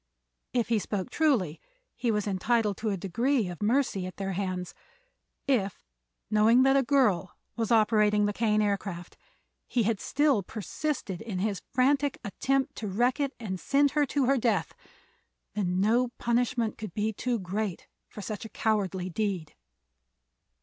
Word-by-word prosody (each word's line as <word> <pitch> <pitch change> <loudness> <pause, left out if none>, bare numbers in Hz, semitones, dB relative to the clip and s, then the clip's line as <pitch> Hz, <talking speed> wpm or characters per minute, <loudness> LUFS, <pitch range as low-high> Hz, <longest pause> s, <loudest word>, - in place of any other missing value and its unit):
If 240 -2 0
he 230 -2 +3
spoke 200 -2 -3
truly 230 - +1 0.3
he 240 - -1
was 210 -2 +1
entitled 210 +2 +1
to 220 - -2
a 200 - -1
degree 230 +6 0
of 175 - -8
mercy 210 -4 +1
at 185 - -9
their 195 -1 -2
hands; 185 -1 -3 0.7
if, 205 -9 0 0.5
knowing 220 +4 +5
that 270 0 +4
a 275 - +5
girl 235 -10 +2 0.2
was 230 -1 -2
operating 210 -2 +4
the 205 - 0
Kane 215 -1 +2
Aircraft, 195 -4 -3 0.5
he 240 - +1
had 215 -1 0
still 285 -4 +2
persisted 215 - -4
in 220 -4 -4
his 200 -1 -1
frantic 275 +2 +2
attempt 270 +7 0
to 215 - -4
wreck 240 +8 +1
it 280 -1 -1
and 190 -5 -4
send 280 +5 +3
her 295 -1 +2
to 280 0 +1
her 270 +1 +3
death, 210 -8 0 0.8
then 185 -3 0
no 230 +5 +3
punishment 235 -1 0
could 215 -6 -7
be 215 +1 0
too 245 +3 -1
great 195 -1 -3 0.2
for 210 - -9
such 210 +1 -5
a 225 - -7
cowardly 200 -4 -1
deed. 185 -3 -2
215 Hz, 155 wpm, -28 LUFS, 195-250 Hz, 0.8 s, knowing